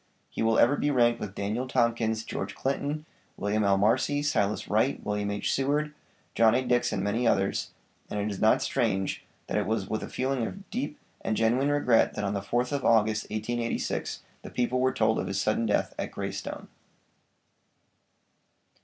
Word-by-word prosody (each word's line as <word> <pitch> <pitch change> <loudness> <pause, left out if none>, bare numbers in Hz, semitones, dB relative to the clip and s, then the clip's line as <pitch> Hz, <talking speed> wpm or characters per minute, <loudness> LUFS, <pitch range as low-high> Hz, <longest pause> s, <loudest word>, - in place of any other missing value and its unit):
He - - -4
will 115 0 +3
ever 130 +5 +5
be 145 - +1
ranked 120 -4 +3
with 100 -2 -6
Daniel 110 +6 -2
Tompkins, 115 -3 +1
George 100 -3 -5
Clinton, 145 +3 -2 0.3
William 105 +1 0
L. 100 -1 +3
Marcy, 130 +8 +2
Silas 105 -8 0
Wright, 110 +6 +1
William 105 0 -1
H. 100 0 -1
Seward, 145 +3 0 0.4
John 115 0 +5
A. 130 - +2
Dix 120 0 +2
and 95 - -1
many 115 +4 +1
others, 95 -3 +1 0.4
and 105 - -3
it 105 +1 -1
is 100 - -6
not 110 - +4
strange 100 -7 0 0.2
that - - -1
it - - -2
was 110 -3 -1
with 110 - -2
a - - -6
feeling 130 -1 -1
of 195 0 -9
deep 240 - -3 0.3
and 110 - -1
genuine 120 +5 +2
regret 125 -6 +3
that 105 - -3
on 100 0 -1
the 100 - -2
4th 120 +6 -1
of 140 -2 -1
August, 110 -1 +3
1886, 115 +2 -2 0.2
the - - -9
people 125 +1 0
were 130 +1 +3
told 110 0 +2
of - - -2
his 95 0 -1
sudden 110 +3 +1
death 105 - +1
at - - -3
'Greystone.' - - -5
115 Hz, 180 wpm, -28 LUFS, 105-130 Hz, 0.4 s, ever